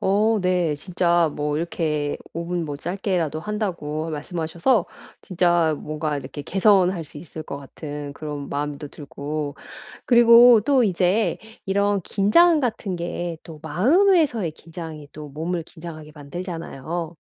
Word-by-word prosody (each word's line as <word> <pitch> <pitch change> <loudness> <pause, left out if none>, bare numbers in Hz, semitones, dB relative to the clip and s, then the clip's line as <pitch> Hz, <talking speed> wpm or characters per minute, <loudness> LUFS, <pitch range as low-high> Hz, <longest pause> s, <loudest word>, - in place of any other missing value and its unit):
어 215 +3 +2
네. 180 -4 +1
진짜 170 0 +1
뭐 150 0 -1
이렇게 155 -3 -1 0.2
5 170 0 -4
분 175 -1 -2
뭐 145 -2 -5
짧게라도 175 -3 -2
한다고 170 -6 -3
말씀하셔서 170 - 0 0.3
진짜 175 -3 +2
뭔가 155 0 -3
이렇게 140 +1 -7
개선할 190 -1 +3
수 145 0 -11
있을 160 0 -8
것 140 -2 -6
같은 145 +1 -7
그런 145 -2 -6
마음도 145 0 -4
들고 145 0 -5 0.5
그리고 235 -1 +8
또 270 0 +3
이제 190 +3 +2 0.3
이런 200 +1 +1
긴장 305 - +4
같은 215 -7 -2
게 175 0 -4 0.2
또 160 -2 -10
마음에서의 255 - +3
긴장이 160 -2 -9
또 150 -1 -9
몸을 165 +4 -3
긴장하게 155 -2 -10
만들잖아요. 165 +1 -6
170 Hz, 275 characters per minute, -23 LUFS, 150-195 Hz, 0.5 s, 그리고